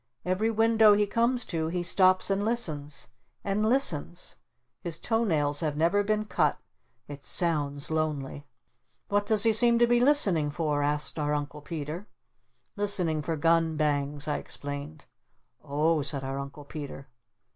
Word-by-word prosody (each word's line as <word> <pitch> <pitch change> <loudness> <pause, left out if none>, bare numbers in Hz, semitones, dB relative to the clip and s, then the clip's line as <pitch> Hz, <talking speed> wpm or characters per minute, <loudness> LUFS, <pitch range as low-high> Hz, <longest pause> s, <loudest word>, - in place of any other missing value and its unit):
Every 185 +5 0
window 225 -1 +4
he 210 0 +2
comes 235 +3 0
to 160 -3 -3
he 175 +2 -2
stops 185 +2 +3
and 195 +1 0
listens! 150 - -2 0.3
And 200 +2 -1
listens! 175 - -1 0.5
His 170 -2 -4
toe 225 +4 -1
nails 145 -7 +1
have 150 -3 -2
never 170 +6 +2
been 215 +1 -1
cut! - - 0 0.5
It 145 -1 -10
sounds 145 -4 0
lonely!" 150 -3 -3 0.6
"What 205 0 0
does 215 -2 +5
he 225 - +4
seem 235 +1 +6
to 240 - +5
be 240 0 +2
listening 210 - +3
for?" 150 -2 -1
said 150 +1 -1
our 150 0 0
Uncle 150 0 -5
Peter. 160 +5 -6 0.7
"Listening 185 -7 0
for 165 +2 -3
gun 165 0 +2
bangs," 145 -1 0
I 150 - 0
explained. 145 +4 -7 0.6
"O 155 +3 +1
h," 145 - -2
said 135 -1 -4
our 135 +1 -4
Uncle 140 +1 -8
Peter. 140 -2 -8
160 Hz, 155 wpm, -27 LUFS, 145-205 Hz, 0.7 s, seem